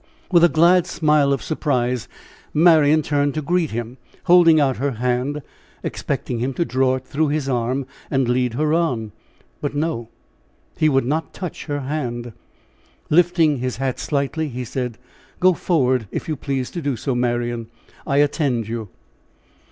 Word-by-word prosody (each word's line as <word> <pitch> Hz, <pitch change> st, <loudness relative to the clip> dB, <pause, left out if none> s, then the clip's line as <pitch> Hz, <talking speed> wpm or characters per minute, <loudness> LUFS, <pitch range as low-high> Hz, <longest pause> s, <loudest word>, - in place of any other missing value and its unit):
With 170 Hz, -2 st, +5 dB
a 175 Hz, -, +7 dB
glad 170 Hz, +3 st, +4 dB
smile 150 Hz, -3 st, +2 dB
of 135 Hz, -, 0 dB
surprise 125 Hz, -6 st, -1 dB, 0.5 s
Marian 155 Hz, -2 st, +5 dB
turned 145 Hz, 0 st, 0 dB
to 155 Hz, -, -1 dB
greet 175 Hz, 0 st, +1 dB
him, 120 Hz, +2 st, -5 dB, 0.3 s
holding 175 Hz, -3 st, +6 dB
out 135 Hz, -3 st, +2 dB
her 140 Hz, +2 st, -1 dB
hand, 125 Hz, +5 st, -1 dB, 0.4 s
expecting 120 Hz, -, -3 dB
him 130 Hz, +2 st, -2 dB
to 170 Hz, -, 0 dB
draw 130 Hz, -1 st, +1 dB
it 130 Hz, 0 st, -7 dB
through 155 Hz, +2 st, 0 dB
his 145 Hz, -1 st, -1 dB
arm 130 Hz, +1 st, -1 dB, 0.2 s
and 135 Hz, -3 st, +1 dB
lead 125 Hz, -1 st, +1 dB
her 150 Hz, +3 st, +1 dB
on. 125 Hz, -11 st, 0 dB, 0.5 s
But 145 Hz, -1 st, -3 dB
no, 145 Hz, -7 st, -2 dB, 0.7 s
he 155 Hz, -, +3 dB
would 135 Hz, -3 st, +2 dB
not 155 Hz, +5 st, -2 dB
touch 180 Hz, -3 st, -6 dB
her 145 Hz, -2 st, -3 dB
hand. 120 Hz, -4 st, -4 dB, 0.8 s
Lifting 165 Hz, -2 st, +4 dB
his 125 Hz, 0 st, -3 dB
hat 130 Hz, -1 st, -2 dB
slightly, 150 Hz, +2 st, -1 dB
he 125 Hz, 0 st, -5 dB
said: 125 Hz, -1 st, -4 dB, 0.4 s
"Go 185 Hz, 0 st, +5 dB
forward 130 Hz, -, +1 dB
if -, -, -5 dB
you 155 Hz, -, -1 dB
please 135 Hz, -2 st, -3 dB
to 170 Hz, -, -5 dB
do 140 Hz, -3 st, -1 dB
so, 130 Hz, +4 st, -2 dB
Marian. 120 Hz, -1 st, -1 dB, 0.4 s
I 140 Hz, -2 st, +1 dB
attend 135 Hz, -7 st, -1 dB
you." 110 Hz, -2 st, -5 dB
140 Hz, 160 wpm, -21 LUFS, 125-155 Hz, 0.8 s, a